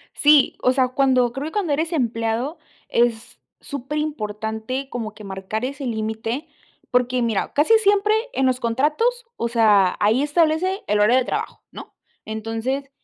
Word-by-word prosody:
Sí, 295 -2 +5
o 255 - +4
sea, 260 -1 +2
cuando 255 -2 +2
creo 275 +4 -4
que - - -7
cuando 370 -8 -1
eres 320 +4 -1
empleado 235 +1 -1 0.3
es 235 -1 0 0.2
superimportante 260 -3 -4
como 225 -3 -5
que 215 - -13
marcar 195 +5 -4
ese 280 +1 -5
límite, 225 +5 -3 0.4
porque 250 0 +1
mira, 225 -4 -1
casi 325 +11 +5
siempre 410 0 +3 0.2
en 265 - 0
los 255 -1 +1
contratos, 305 - 0
o 235 - -2
sea, 210 -5 +4
ahí 220 +6 +3
establece 330 +5 +1
el 210 0 +1
horario 225 +5 +5
de 255 - +1
trabajo, - - -4
¿no? - - -11 0.3
Entonces 225 +6 -4
255 Hz, 150 wpm, -22 LUFS, 225-295 Hz, 0.4 s, Sí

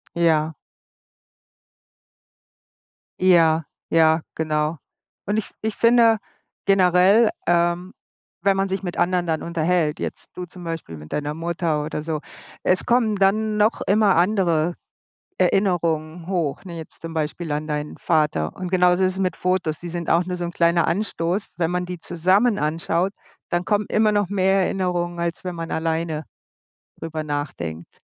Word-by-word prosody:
Ja. 160 -2 +2 2.7
Ja, 165 -3 +5 0.3
ja, 160 0 +4
genau. 155 0 -1 0.5
Und, 205 +2 0
ich 220 - -3
ich 220 -1 -2
finde 230 -1 +5 0.5
generell, 195 +3 +5 0.2
ähm, 175 +1 +1 0.5
wenn 195 +1 +2
man 195 0 +1
sich 190 +1 -3
mit 175 -2 -4
anderen 180 0 +1
dann 160 -1 -1
unterhält, 170 -2 0
jetzt - - -6
du 180 - -6
zum 180 0 -12
Beispiel 165 - -5
mit 75 0 -10
deiner 150 0 -2
Mutter 165 -1 -1
oder 150 0 -4
so, 155 -1 -2 0.4
es 185 - +2
kommen 235 -3 +2
dann 210 +2 +2
noch 210 +2 +2
immer 205 -1 +4
andere 175 -3 +2 0.6
Erinnerungen 170 -3 +1
hoch, 175 -6 -2
ne, 175 -3 -8
jetzt 160 -1 -10
zum 165 0 -7
Beispiel 160 +1 -3
an 150 +1 -3
deinen 150 0 -3
Vater. 150 - 0
Und 185 -1 -5
genauso 180 0 +4
ist 185 - +2
es - - -7
mit 185 -1 0
Fotos, 180 -4 0
die 175 - -7
sind 170 0 -4
auch 170 +1 +4
nur 180 -1 -3
so 175 - -4
'n 170 - -3
kleiner 170 0 +2
Anstoß. 185 -1 -1
Wenn 165 -1 0
man 180 0 -1
die 180 -1 -6
zusammen 190 +8 +2
anschaut, 165 +5 0 0.4
dann 175 +1 -1
kommen 205 +1 +1
immer 215 0 +3
noch 205 -3 +1
mehr 195 0 +2
Erinnerungen, 175 -2 -1
als 170 +1 -3
wenn 180 -1 -4
man 165 0 -5
alleine 160 -1 -1 0.7
darüber 160 -1 -5
nachdenkt. 85 - -5
175 Hz, 155 wpm, -22 LUFS, 160-190 Hz, 2.7 s, Ja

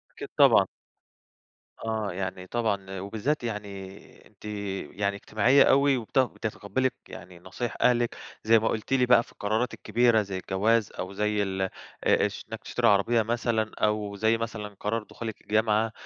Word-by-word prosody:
أكيد - - -7
طبعًا. - - +6 1.2
آه 110 -3 -2
يعني 95 0 -5
طبعًا 100 -4 -2
وبالذات 115 +9 -2
يعني 100 -3 -7
أنتِ 105 -1 -22 0.5
يعني 100 0 -1
اجتماعية 120 +7 +4
أوي 140 0 +4
وبت 120 +2 -2
بتتقبلي 125 0 0 0.2
يعني 90 +1 -11
نصايح 95 +7 -5
أهلِك 120 -1 +2 0.3
زي 115 +1 +6
ما 110 - +1
قُلتِ 110 +4 -4
لي 125 -2 +4
بقى 125 -1 +6
في - - -18
القرارات 110 +4 -1
الكبيرة 120 -2 +2
زي 100 -2 -5
الجواز 105 +4 +1
أو 95 +1 -4
زي 105 +1 0
ال 95 -1 -3
آآ 95 - -1 0.6
اش - - -7
إنك - - -5
تشتري - - 0
عربية 105 +3 +3
مثلًا 115 -1 -1
أو 105 -1 0
زي 110 +3 +2
مثلًا 110 -3 -5
قرار 115 +2 -1
دخولِك 110 0 -7
الجامعة 110 +1 +1
110 Hz, 155 wpm, -27 LUFS, 100-115 Hz, 1.2 s, طبعًا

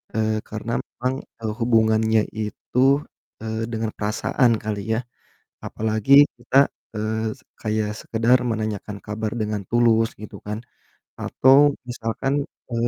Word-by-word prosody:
Eee, 110 0 +1
karena 110 +2 -5
memang 130 +1 -3 0.3
e - - -14 0.2
hubungannya 110 -1 +3 0.2
itu, 105 +3 -4 0.6
eee, 110 0 -3
dengan 110 -1 -2
perasaan 115 +4 +1
kali 105 -1 -2
ya 115 - +1 0.7
apalagi 110 +3 -1 0.3
kita, 125 +2 -3 0.4
eee, 110 +1 -1
se - - -24 0.2
kayak 110 -1 0
sekedar 115 +3 +3
menanyakan 110 -2 -3
kabar 105 +1 -3
dengan 105 -1 -1
tulus 115 -1 +3
gitu 105 - -8
kan 105 +1 -3 0.6
atau 130 +1 +4 0.3
misalkan 120 +3 -2 0.4
e - - -4
110 Hz, 120 wpm, -23 LUFS, 110-115 Hz, 0.7 s, atau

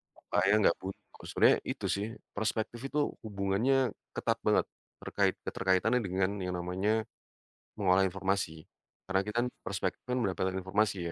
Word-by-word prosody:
Supaya 100 - +1 0.2
gak 85 - 0
buntu. 95 +1 -6 0.3
Sebenarnya - - +5
itu - - -4
sih 100 +2 0 0.3
perspektif 110 +2 -1
itu 150 - -1 0.3
hubungannya 110 +6 +2 0.3
ketat - - 0
banget, - - +4 0.4
terkait - - +1
keterkaitan 95 +6 +2
dengan 95 +1 +1
yang 90 -1 -2
namanya, 100 +5 0 0.7
mengolah 95 -2 +4
informasi, 95 -4 -2 0.4
karena 95 0 +2
kita 105 - -4
kan - - 0 0.2
perspektif 95 -1 -2
kan 125 0 0
mendapatkan 95 -1 0
informasi 95 +2 +1
95 Hz, 135 wpm, -31 LUFS, 95-110 Hz, 0.7 s, Sebenarnya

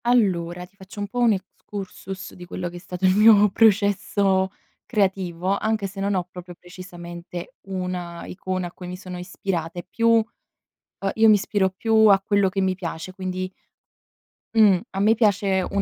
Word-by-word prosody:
Allora, 180 -7 +1
ti 190 - -27
faccio 195 +2 -11
un 205 - -2
po' 245 +5 -5
un 235 -2 +5
excursus 195 0 -7
di 180 - -11
quello 175 0 -5
che 175 - -10
è - - -7
stato 180 +1 -4
il 185 0 +4
mio 210 -1 +7
processo 200 -2 +3 0.3
creativo, 190 -3 0
anche 220 0 -1
se 195 +1 -7
non 200 0 0
ho 180 - 0
proprio 180 -1 -10
precisamente 175 -1 -9
una 180 -2 -4
icona 185 -1 -4
a - - -10
cui 180 0 -10
mi 180 0 -6
sono 180 -1 -8
ispirata. 180 -2 -4
E 175 - -5
più, 230 0 0
uhm, 230 -1 +5 0.9
io 225 0 +5
mi 215 - +8
ispiro 195 -1 0
più 220 +3 +3
a 195 -1 +6
quello 200 -1 +2
che 195 - -2
mi 190 -1 +1
piace, 175 -1 -6
quindi, 185 0 -4 1.0
mhmm, 210 -5 +5
a 195 - -4
me 215 +3 +4
piace 200 -4 +2
un 200 - +1
190 Hz, 180 wpm, -23 LUFS, 180-205 Hz, 1.0 s, mi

